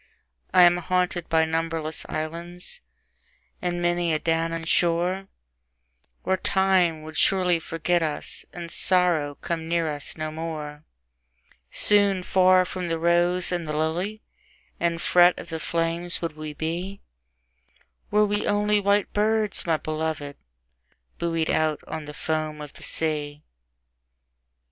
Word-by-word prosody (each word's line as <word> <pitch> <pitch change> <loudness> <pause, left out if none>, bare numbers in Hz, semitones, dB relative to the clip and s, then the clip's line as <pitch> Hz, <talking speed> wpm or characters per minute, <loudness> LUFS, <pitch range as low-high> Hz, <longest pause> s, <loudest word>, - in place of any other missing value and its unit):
I 180 - +7
am 175 0 +6
haunted 180 -1 -1
by 160 0 +3
numberless 160 -1 -2
islands, 170 - -4 0.8
and 175 -1 -2
many 175 -1 +1
a - - 0
Danaan 165 0 -1
shore, 175 +3 +1 1.0
Where 190 0 +1
Time 185 -5 +2
would 155 -1 -8
surely 180 -3 +3
forget 165 +2 -1
us, 155 -2 -2
and 170 -1 -7
Sorrow 175 -6 +2
come 165 +1 -4
near 165 -2 0
us 145 -1 -5
no 155 0 -3
more; 155 -2 -6 0.8
Soon 200 -3 +4
far 185 0 +4
from 180 0 -4
the 165 -1 -1
rose 175 +2 +2
and 175 -3 -2
the 150 0 -2
lily, 175 +8 -2 0.6
and 170 -1 0
fret 175 +1 +5
of - - -9
the 160 - -4
flames 170 +2 -1
would 165 -3 -4
we 155 -1 -7
be, 175 +6 -4 1.1
Were 210 0 +4
we 205 0 -1
only 210 0 +2
white 200 0 +1
birds, 215 -2 +1
my 160 -1 +2
beloved, 155 -2 -4 0.8
buoyed 165 -1 0
out 155 -1 0
on 155 -1 -6
the 150 0 -9
foam 155 -1 -2
of 150 -1 -8
the - - -14
sea! 150 -2 -2
170 Hz, 135 wpm, -25 LUFS, 160-180 Hz, 1.1 s, I